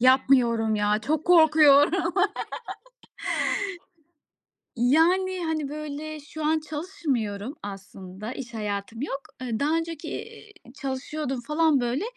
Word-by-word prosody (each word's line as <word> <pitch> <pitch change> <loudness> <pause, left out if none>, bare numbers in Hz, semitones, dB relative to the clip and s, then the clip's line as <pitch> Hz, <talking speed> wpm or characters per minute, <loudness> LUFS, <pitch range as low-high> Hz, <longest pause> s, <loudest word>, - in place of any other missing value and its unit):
Yapmıyorum 250 -3 +4
ya, 210 0 +2
çok 310 +1 0
korkuyorum. 320 +1 +5 2.6
Yani, 345 +10 +3
hani, 310 -3 -1
böyle, 305 +1 -6
şu 300 +1 -6
an 315 +1 +3
çalışmıyorum 285 - -3
aslında. 195 +1 -8
İş 240 -3 -8
hayatım 210 +1 -4
yok. 275 -1 -3 0.2
Iıı, 235 -4 -2
daha 300 +3 +2
önceki, 330 -2 -4
iii, 420 -1 -8 0.2
çalışıyordum 270 0 -4
falan, 300 +1 +2
böyle. 245 +8 -1
280 Hz, 105 wpm, -26 LUFS, 235-315 Hz, 2.6 s, korkuyorum